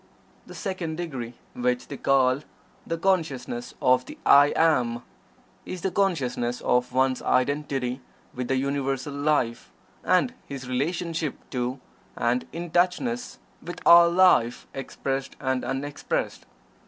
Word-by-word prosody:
The - - -10
second 185 -6 -4
degree, 135 -9 -5 0.2
which 125 0 -1
they 140 - -6
call 130 -1 +3 0.5
"the 165 - -2
Consciousness 160 -10 -1
of 125 0 +4
the - - -10
'I 145 +1 +7
AM'," 125 -7 +2 0.6
is 185 - -6
the 190 - -1
consciousness 130 -11 0
of 125 0 +1
one's 130 0 +1
identity 135 -1 0 0.3
with 125 0 -4
the 135 - +1
Universal 135 0 -1
Life, 140 -5 0 0.3
and 185 +8 +2
his 135 -2 -7
relationship 160 +4 -2 0.2
to, 125 +1 -2 0.4
and 120 +1 0
"in 170 0 -6
touchness" 210 +9 0 0.2
with 175 +1 -7
all 170 0 +8
life, 170 -10 +4
expressed 135 0 -4
and 130 -2 -1
unexpressed. 145 +2 -3
135 Hz, 125 wpm, -26 LUFS, 125-165 Hz, 0.6 s, all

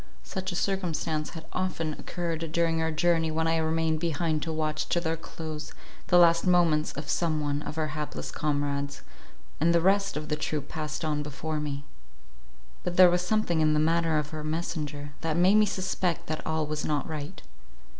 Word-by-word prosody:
Such 190 -1 -4
a - - -4
circumstance 170 -5 -1
had 160 - -9
often 165 -4 -1
occurred 165 -1 -4
during 165 -1 +2
our 160 - +1
journey, 165 0 +2
when 160 +1 0
I 165 0 +2
remained 160 0 +1
behind 160 -1 0
to 165 - -2
watch 155 -1 -1
to 175 - +2
their 165 -1 -1
close 155 -1 -7 0.3
the 180 - +5
last 170 0 +6
moments 170 -4 +3
of 145 +1 -6
some 160 -2 +1
one 145 -1 -1
of 150 - -6
our 155 -1 0
hapless 150 -1 -4
comrades, 145 -1 -1 0.6
and 170 +2 +4
the - - +5
rest 195 +1 +2
of 150 0 -5
the 150 - 0
troop 150 -1 -3
past 155 0 -4
on 150 -1 0
before 150 +2 -3
me. 145 -1 -4 1.0
But 175 0 -3
there 180 -1 +9
was 175 0 +2
something 180 -4 +1
in 155 -1 +4
the - - +3
manner 165 0 +2
of 150 0 -2
her 155 -1 -5
messenger, 150 -2 -3
that 165 0 -1
made 180 +3 +5
me 215 0 +5
suspect 185 -3 -1
that 155 0 -4
all 160 -1 0
was 150 0 -3
not 150 -2 -1
right. 150 -3 -5
160 Hz, 190 wpm, -28 LUFS, 150-170 Hz, 1.0 s, there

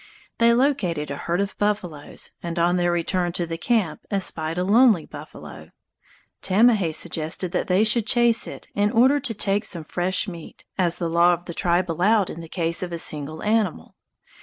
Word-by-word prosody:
They 230 0 +5
located 215 - 0
a - - -3
herd 170 +6 -2
of 200 0 -4
buffaloes, 185 -8 -3
and 170 0 -5
on 175 +1 +2
their 175 0 +1
return 175 +1 -1
to 175 - -1
the 165 0 -6
camp 220 -4 -1
espied 165 -5 -1
a 180 - 0
lonely 210 -3 +4
buffalo. - - -11 0.7
Tamahay 200 -3 +3
suggested 160 +3 -3
that - - -2
they 185 +3 +3
should 220 0 +3
chase 235 -1 +4
it - - -9
in 205 0 +1
order 255 +6 +4
to 235 - -1
take 200 0 0
some 170 -4 -2
fresh 185 +5 -1
meat, 170 -4 -10
as 175 -3 0
the 170 - -2
law 170 +1 +4
of 175 +1 -5
the 170 - -6
tribe 175 0 0
allowed 195 +4 +2
in 170 - -8
the 165 - -11
case 170 -1 -1
of 180 -1 -4
a 170 - -3
single 155 -1 -2
animal. 210 - -1
180 Hz, 185 wpm, -23 LUFS, 170-210 Hz, 0.7 s, They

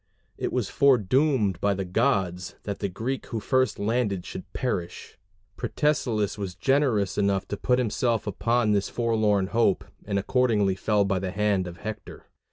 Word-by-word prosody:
It - - -3
was - - -1
foredoomed 125 - +2
by 100 -1 +2
the 95 0 -3
gods 95 -3 0
that 100 -1 -4
the 100 - -2
Greek 120 +8 -4
who 115 - -3
first 130 +1 +1
landed 105 -3 -1
should 95 0 -8
perish: 90 -9 -4 0.4
Protesilaus 115 -9 0
was 95 -3 -4
generous 110 - +1
enough 100 -1 +1
to - - -2
put 125 +4 +1
himself 115 -2 0
upon 115 +2 +1
this 100 -1 +1
forlorn 110 -4 +1
hope, 115 -5 +2 0.2
and 100 -1 -1
accordingly 105 -2 +2
fell 100 +1 +1
by 95 -1 0
the 95 0 -3
hand 100 -1 0
of 85 0 -8
Hector. 110 +2 -8
105 Hz, 160 wpm, -26 LUFS, 95-120 Hz, 0.4 s, foredoomed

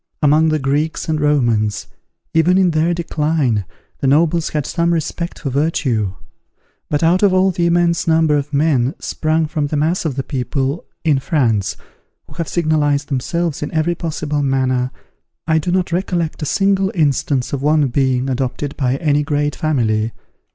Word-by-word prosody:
among 155 +2 +4
the 155 - +1
Greeks 145 +3 -1
and 155 -2 -1
Romans, 120 -8 +1 0.5
even 165 +3 +4
in 185 -2 +3
their 160 +2 +1
decline, 150 - 0 0.3
the 135 - 0
nobles 160 +3 +2
had 150 -2 -2
some 170 0 0
respect 170 +1 -3
for 140 - -4
virtue; 125 - 0 0.7
but 145 +2 0
out 175 +3 +3
of 200 -3 +4
all 190 +1 +3
the 170 -1 0
immense 170 +1 +1
number 160 -2 +3
of 145 0 -2
men, 140 -3 +1
sprung 155 +1 -1
from 150 -1 -2
the 150 - -2
mass 160 +5 0
of 155 -6 -2
the 135 - -2
people, 135 +3 -2 0.2
in 150 -4 +2
France, 120 - 0 0.5
who - - -16
have 165 0 -4
signalized 150 -4 0
themselves 155 +4 -2
in 150 - -4
every 160 +2 +1
possible 155 -3 -3
manner, 130 -2 +1 0.6
I 160 -1 +2
do 165 +3 -2
not 180 -1 0
recollect 170 -3 -2
a - - -1
single 195 +1 +1
instance 140 -4 0
of 140 - -2
one 150 +1 +3
being 130 0 +1
adopted 135 +2 -2
by 130 -2 +1
any 145 0 +1
great 145 0 -1
family. 115 -7 0
150 Hz, 165 wpm, -18 LUFS, 135-165 Hz, 0.7 s, among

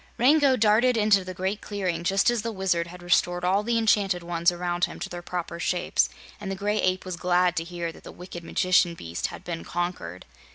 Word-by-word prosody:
Rango 275 +2 +5
darted 225 +3 +4
into 210 -3 +4
the 185 0 -7
Great 190 +3 -2
Clearing 185 -5 -3
just 195 +6 +3
as 240 -2 -1
the 230 +2 -3
Wizard 185 -4 0
had 180 +1 -11
restored 175 0 +1
all 190 +3 +3
the 230 +2 0
enchanted 200 -5 +2
ones 170 0 +1
around 175 0 -1
him - - -10
to - - -5
their 175 0 -6
proper 175 -1 -5
shapes, 175 +1 +1 0.3
and 205 -2 -6
the 195 - -2
Gray 205 +2 -1
Ape 185 0 0
was 185 -1 -4
glad 180 0 +2
to 165 - 0
hear 170 -1 -5
that - - -16
the - - -9
wicked 175 -1 -9
magician 180 0 +2
beast 85 - -4
had - - -10
been 170 -2 -5
conquered. 175 - -4
180 Hz, 215 wpm, -26 LUFS, 175-205 Hz, 0.3 s, Rango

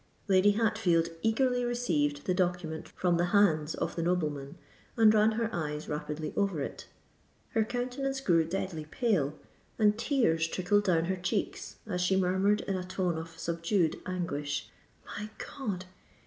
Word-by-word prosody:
Lady 195 +1 +5
Hatfield 205 -7 +2
eagerly 245 +2 +2
received 150 -13 0
the 185 - +1
document 175 -3 -1
from 175 -2 +1
the 175 - +2
hands 160 -6 +3
of - - -3
the 170 - -1
nobleman, 150 -5 -1 0.4
and 220 -2 +7
ran 215 +1 +4
her 230 +1 0
eyes 150 -2 -3
rapidly 150 +1 -4
over 195 -6 +1
it. 135 - -5 0.6
Her 225 -3 +2
countenance 255 +4 -2
grew 170 -10 +3
deadly 165 -2 -3
pale, 165 - 0 0.4
and 210 -1 +4
tears 165 - +2
trickled 200 +4 +1
down 170 -4 +3
her 190 +2 -1
cheeks, 180 +4 -2
as 180 -4 -2
she 180 +2 +2
murmured 190 +3 +2
in 195 - -2
a 180 - -3
tone 180 -1 -1
of 160 0 -7
subdued 170 0 0
anguish, 150 -5 -3 0.3
"My 210 +1 -6 0.3
God! 200 -10 -3
180 Hz, 150 wpm, -30 LUFS, 165-215 Hz, 0.6 s, and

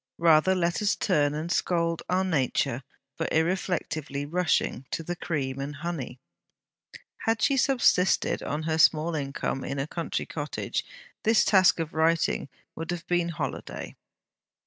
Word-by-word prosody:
Rather 165 +2 +5
let 170 0 0
us 210 0 +2
turn 150 -6 +1
and 160 +3 -3
scold 170 -2 0
our 185 +1 +2
nature 150 -9 0 0.3
for - - -2
irreflectively 160 -4 -1
rushing 170 -5 0
to 165 - -3
the 175 +2 -3
cream 135 -6 -3
and 140 +1 -4
honey! 150 -5 -5 1.1
Had 225 0 +2
she 275 +6 +3
subsisted 250 -9 +3
on 150 +2 -3
her 160 0 -1
small 160 +1 +4
income 140 -2 -3
in 140 - -4
a 135 - -1
country 165 +2 -3
cottage, 150 -1 -3 0.4
this 225 0 +4
task 190 -4 +5
of 165 -1 -3
writing 160 -2 +1 0.2
would 165 0 -6
have 175 -1 -3
been 175 -1 +1
holiday. 165 - -5
165 Hz, 145 wpm, -27 LUFS, 150-180 Hz, 1.1 s, Rather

